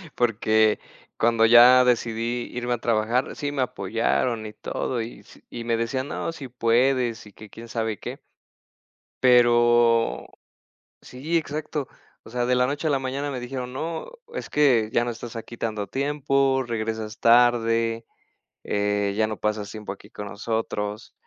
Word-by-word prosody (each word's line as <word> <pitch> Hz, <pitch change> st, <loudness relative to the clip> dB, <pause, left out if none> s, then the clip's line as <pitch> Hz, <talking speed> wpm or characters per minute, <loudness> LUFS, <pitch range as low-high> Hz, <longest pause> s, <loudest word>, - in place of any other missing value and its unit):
porque 110 Hz, -2 st, +2 dB, 0.4 s
cuando 115 Hz, -1 st, +3 dB
ya 120 Hz, +2 st, +8 dB
decidí 120 Hz, 0 st, 0 dB
irme 125 Hz, 0 st, -1 dB
a -, -, -1 dB
trabajar, 115 Hz, +2 st, 0 dB
sí 145 Hz, -1 st, -3 dB
me 140 Hz, -2 st, -2 dB
apoyaron 115 Hz, +1 st, -1 dB
y 105 Hz, -, -7 dB
todo 120 Hz, +2 st, -3 dB
y 115 Hz, +2 st, -7 dB
s -, -, -19 dB
y 120 Hz, -, -6 dB
me 115 Hz, 0 st, 0 dB
decían: 130 Hz, +4 st, -2 dB
"No, -, -, -3 dB
si 140 Hz, -5 st, -8 dB
puedes" 120 Hz, 0 st, +1 dB
y 105 Hz, -, -16 dB
que 105 Hz, +2 st, -13 dB
quién 115 Hz, +4 st, -11 dB
sabe 110 Hz, -2 st, -2 dB
qué. -, -, -7 dB, 1.0 s
Pero 120 Hz, -2 st, +4 dB, 0.8 s
sí, 150 Hz, +7 st, -2 dB
exacto. 150 Hz, -2 st, -4 dB, 0.3 s
O -, -, -13 dB
sea, 120 Hz, +1 st, -1 dB
de 125 Hz, +1 st, +2 dB
la 125 Hz, 0 st, +3 dB
noche 145 Hz, +3 st, -2 dB
a -, -, +2 dB
la 140 Hz, -2 st, +1 dB
mañana 135 Hz, +2 st, -3 dB
me 125 Hz, -, -4 dB
dijeron: 125 Hz, 0 st, -5 dB
"No, 160 Hz, +4 st, -4 dB, 0.3 s
es -, -, -5 dB
que 125 Hz, -7 st, +3 dB
ya 120 Hz, -, +3 dB
no 120 Hz, -, -2 dB
estás 120 Hz, +1 st, -9 dB
aquí 115 Hz, +1 st, -8 dB
tanto 110 Hz, -3 st, -3 dB
tiempo, 135 Hz, -1 st, +1 dB
regresas 110 Hz, -1 st, -4 dB
tarde, 115 Hz, -1 st, +3 dB, 0.6 s
eh, 105 Hz, 0 st, 0 dB
ya 110 Hz, 0 st, +2 dB
no 110 Hz, -1 st, -5 dB
pasas 105 Hz, -1 st, -2 dB
tiempo 105 Hz, -1 st, -7 dB
aquí 100 Hz, -, -11 dB
con 105 Hz, -, -7 dB
nosotros" 105 Hz, -1 st, -4 dB
120 Hz, 160 wpm, -24 LUFS, 110-130 Hz, 1.0 s, ya